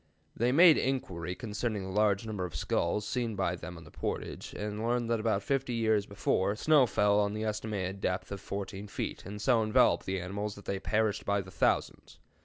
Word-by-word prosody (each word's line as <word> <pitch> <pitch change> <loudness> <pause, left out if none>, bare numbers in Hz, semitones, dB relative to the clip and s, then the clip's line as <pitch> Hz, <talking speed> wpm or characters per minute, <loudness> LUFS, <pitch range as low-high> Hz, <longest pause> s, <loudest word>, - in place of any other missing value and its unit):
They 120 +2 +2
made 165 +3 +7
inquiry 90 -10 -2
concerning 105 -1 -3
the 95 - -6
large 105 +1 +2
number 105 -4 -3
of 90 -4 -5
skulls 85 +7 0
seen 120 -4 -1
by 95 -2 0
them 90 0 -8
on 85 - -11
the 80 - -15
portage, - - -4
and 105 +1 -4
learned 120 0 0
that 115 - +2
about 110 -3 0
fifty 135 -1 -1
years 110 -3 +1
before, 100 0 0
snow 145 +2 +4
fell 105 -1 +3
to - - -4
the 110 +1 -2
estimated 105 -3 -3
depth 90 +2 -2
of 100 -1 -5
14 100 0 -5
feet, 100 - -4
and 105 +1 -6
so 115 +1 +3
enveloped 110 -1 +3
the 95 0 -1
animals 100 +3 -4
that 100 - -13
they 100 - -2
perished 105 +1 0
by 100 0 +1
thousands. 95 +1 -1
105 Hz, 200 wpm, -31 LUFS, 95-115 Hz, -, made